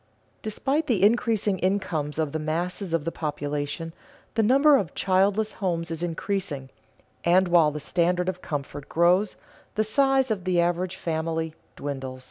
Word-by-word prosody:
Despite 275 +8 -1
the 210 -7 +2
increasing 215 -3 +2
incomes 175 -6 -1
of 155 -3 0
the 160 - -2
masses 170 +4 -2
of 165 -2 0
the 165 - -1
population, 150 +1 -3 0.4
the 225 - +2
number 275 +7 +6
of 195 -10 -3
childless 200 +3 +2
homes 170 -3 -2
is 165 0 -4
increasing, 165 -5 -3 0.5
and 180 +2 +4
while 170 -3 +5
the 150 0 -5
standard 180 +4 +1
of 185 -1 -3
comfort 145 -1 -5
grows, 180 +4 +3 0.4
the 215 - +2
size 270 +3 +2
of 195 -4 -1
the 180 -1 +1
average 175 +1 0
family 160 -1 -2 0.2
dwindles. 135 -2 -5
175 Hz, 150 wpm, -26 LUFS, 160-205 Hz, 0.5 s, number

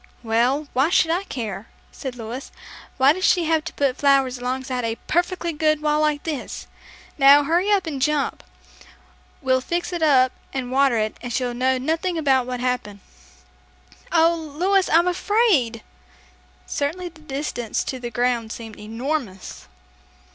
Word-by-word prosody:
"Well, 245 +6 +1
why 265 +5 +3
should 325 -2 +3
I 365 +4 -1
care?" 220 - -5 0.2
said 260 -2 -6
Louis. 240 +3 -7 0.5
"Why 270 +2 +5
did 370 - -6
she 355 -2 +4
have 320 -1 +1
to - - -6
put 275 -2 0
flowers 270 -3 +2
alongside 255 +1 -3
of - - -1
a 225 0 -1
perfectly 345 0 0
good 310 0 +1
wall 300 0 +1
like 300 -1 +1
this? 300 -6 -5 0.5
Now, 280 +1 +7
hurry 345 +7 +1
up 395 -3 +2
and 285 -5 -4
jump. 295 0 0 1.0
We'll 260 0 +2
fix 345 +5 -3
it 345 - -3
up 260 -5 +4 0.2
and 255 -2 -3
water 270 -2 +3
it, 215 0 -1
and 245 - -6
she'll 245 0 -1
know 260 +2 +1
nothing 325 +6 -1
about 265 -5 +2
what 250 -1 -3
happened." 245 -6 -2 1.1
"Oh, 330 0 +4
Louis, 345 +5 0
I'm 335 +2 +4
afraid!" 360 - +1 0.8
Certainly 350 +6 -3
the 320 -2 -19
distance 275 -6 -3
to 260 - -5
the 240 -1 -5
ground 235 -1 -1
seemed 225 -2 -8
enormous! 225 -2 -5
275 Hz, 155 wpm, -22 LUFS, 250-320 Hz, 1.1 s, Now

